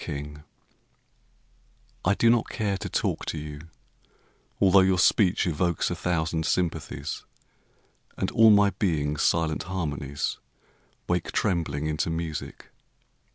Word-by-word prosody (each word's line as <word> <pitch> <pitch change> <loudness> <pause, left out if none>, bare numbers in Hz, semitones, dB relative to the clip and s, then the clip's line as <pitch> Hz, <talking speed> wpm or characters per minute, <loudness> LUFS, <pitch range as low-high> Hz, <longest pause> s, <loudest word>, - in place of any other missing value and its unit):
Dreams 75 -1 -6 1.6
I 100 +3 +2
do 115 +2 +4
not 120 -2 +1
care 105 -2 -1
to - - -5
talk - - -1
to - - -3
you 75 +1 -8 0.9
although 95 0 +6
Your 95 -1 +3
speech 95 +2 +3
evokes 85 0 0
a - - -1
thousand 80 -2 -1
sympathies, 80 -4 -2 0.9
And - - -1
all 110 0 +6
my 100 -1 +5
being's 75 -6 -1
silent 80 -2 +1
harmonies 75 -6 -3 0.7
Wake 90 -1 -1
trembling 85 -7 -1
into 75 +1 -1
music. 80 -2 -5
85 Hz, 115 wpm, -26 LUFS, 75-95 Hz, 1.6 s, although